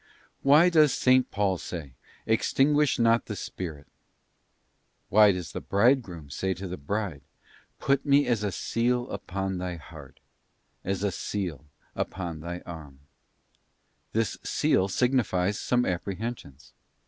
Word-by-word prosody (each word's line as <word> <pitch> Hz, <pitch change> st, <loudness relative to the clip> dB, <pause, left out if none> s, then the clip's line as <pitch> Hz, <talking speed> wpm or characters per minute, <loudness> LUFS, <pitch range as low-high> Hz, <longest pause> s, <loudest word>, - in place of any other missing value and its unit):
Why 150 Hz, +6 st, +6 dB
does 155 Hz, -5 st, +4 dB
S. 130 Hz, 0 st, +7 dB
Paul 100 Hz, -3 st, 0 dB
say, 75 Hz, -7 st, -7 dB, 0.2 s
' -, -, -27 dB
Extinguish 145 Hz, +4 st, +2 dB
not 115 Hz, 0 st, +3 dB
the 105 Hz, -, -4 dB
Spirit'?* 80 Hz, -7 st, -6 dB, 1.2 s
Why 105 Hz, 0 st, +7 dB
does 90 Hz, -3 st, -5 dB
the -, -, -5 dB
Bridegroom 100 Hz, -, +1 dB
say 95 Hz, +5 st, -1 dB
to 95 Hz, +1 st, -6 dB
the 90 Hz, -, -5 dB
Bride, 90 Hz, 0 st, -3 dB, 0.3 s
' -, -, -31 dB
Put 140 Hz, 0 st, +1 dB
Me 145 Hz, 0 st, +4 dB
as 120 Hz, -4 st, 0 dB
a 100 Hz, -, -1 dB
seal 120 Hz, +5 st, 0 dB
upon 95 Hz, 0 st, -3 dB
thy 90 Hz, -1 st, -3 dB
heart, 75 Hz, -4 st, -13 dB, 0.6 s
as 95 Hz, +1 st, -2 dB
a 100 Hz, -, +1 dB
seal 90 Hz, -7 st, -4 dB, 0.3 s
upon 85 Hz, -4 st, -4 dB
thy 85 Hz, +2 st, -6 dB
arm'?ft 75 Hz, -5 st, -11 dB, 1.1 s
This 110 Hz, -1 st, -1 dB
seal 95 Hz, -, +2 dB
signifies 105 Hz, -4 st, +1 dB
some 125 Hz, 0 st, +1 dB
apprehensions. 95 Hz, -, -5 dB
100 Hz, 135 wpm, -27 LUFS, 85-120 Hz, 1.2 s, S